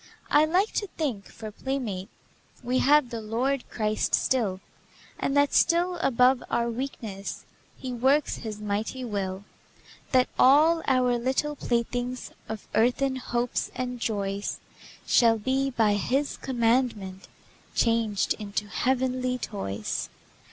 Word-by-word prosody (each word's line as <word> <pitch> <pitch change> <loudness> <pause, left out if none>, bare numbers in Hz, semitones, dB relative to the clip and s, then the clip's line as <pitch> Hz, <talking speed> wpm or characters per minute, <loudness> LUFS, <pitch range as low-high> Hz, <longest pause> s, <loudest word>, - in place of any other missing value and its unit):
I 295 +1 +6
like 370 +7 +2
to 410 - -1
think, 255 -11 -2
for 220 -1 -9
playmate 220 -6 -4 0.5
We 250 +1 +1
have 290 -2 +4
the 230 -1 -4
Lord 245 +5 -1
Christ 215 -2 0
still, 215 -8 0 0.6
And 275 - 0
that 285 0 +3
still 350 +1 +3
above 255 -4 +3
our 235 0 0
weakness 225 -6 -5 0.3
He 255 -1 -5
works 270 +5 +2
His 215 -2 -6
mighty 210 +5 -3
will, 195 -3 -3 0.7
That 255 -1 +4
all 310 +5 +6
our 250 -2 +3
little 265 +4 0
playthings 245 0 -2 0.2
Of 220 -2 -6
earthen 260 +3 +2
hopes 245 -1 -2
and 250 -1 -3
joys 200 -3 -2 0.5
Shall 230 -2 +4
be, 265 +5 0
by 225 -5 +2
His 265 +8 0
commandment, 230 -6 0 0.5
Changed 230 -3 +2
into 205 0 -4
heavenly 255 +2 0
toys. 105 - -4
245 Hz, 125 wpm, -27 LUFS, 215-265 Hz, 0.7 s, I